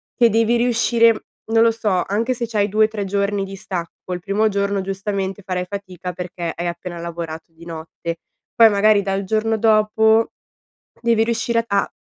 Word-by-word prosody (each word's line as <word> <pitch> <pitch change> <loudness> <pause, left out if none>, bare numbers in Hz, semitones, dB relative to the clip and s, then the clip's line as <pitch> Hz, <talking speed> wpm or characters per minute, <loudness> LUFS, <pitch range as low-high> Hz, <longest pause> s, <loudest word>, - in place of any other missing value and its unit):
che 235 -2 +5
devi 230 +2 +2
riuscire 235 -1 +3 0.3
non 225 0 +4
lo 230 - +5
so, 210 -5 0
anche 225 +6 0
se 240 -1 -2
c'hai 215 -3 0
2-3 215 0 +1
giorni 200 0 0
di 195 0 -8
stacco, 185 -3 -6
il 180 - -2
primo 205 +4 +1
giorno 200 0 0
giustamente 195 0 -3
farai 185 -2 -2
fatica 185 -2 -6
perché 175 -1 -5
hai 175 +1 -4
appena 175 0 -5
lavorato 165 -1 -6
di 165 +1 -16
notte, 165 0 -6 0.4
poi 230 -1 +7
magari 205 0 +4
dal 195 0 -2
giorno 220 +3 0
dopo 220 +1 +3 0.7
devi 230 -1 +3
riuscire 230 0 0
a 200 -2 0
200 Hz, 165 wpm, -20 LUFS, 185-225 Hz, 0.7 s, poi